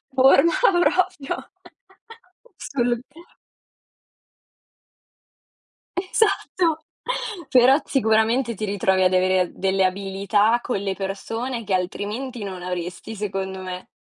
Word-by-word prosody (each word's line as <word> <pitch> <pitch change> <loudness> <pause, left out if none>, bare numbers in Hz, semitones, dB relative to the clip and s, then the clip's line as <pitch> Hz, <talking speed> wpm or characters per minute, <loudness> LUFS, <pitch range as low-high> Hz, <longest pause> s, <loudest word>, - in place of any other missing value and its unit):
forma 270 +5 +6 0.3
proprio. 330 -3 -1 1.1
Solo 240 -3 -1
tu 320 +4 -16 2.8
Esatto. 370 -4 +1 0.7
Però 255 +1 +6
sicuramente 230 0 +2
ti 215 +2 -3
ritrovi 190 -2 +1
ad 185 - +3
avere 185 0 +3
a 180 - +1
delle 190 0 +1
abilità 200 +4 +1
con 240 -5 -2
le 195 -1 -2
persone 225 +5 -4
che 200 -2 -3
altrimenti 210 +6 -3
non 185 -2 -6
avresti 180 +4 -5
secondo 190 -2 -4
me. 185 -1 -7
210 Hz, 100 wpm, -23 LUFS, 190-255 Hz, 2.8 s, forma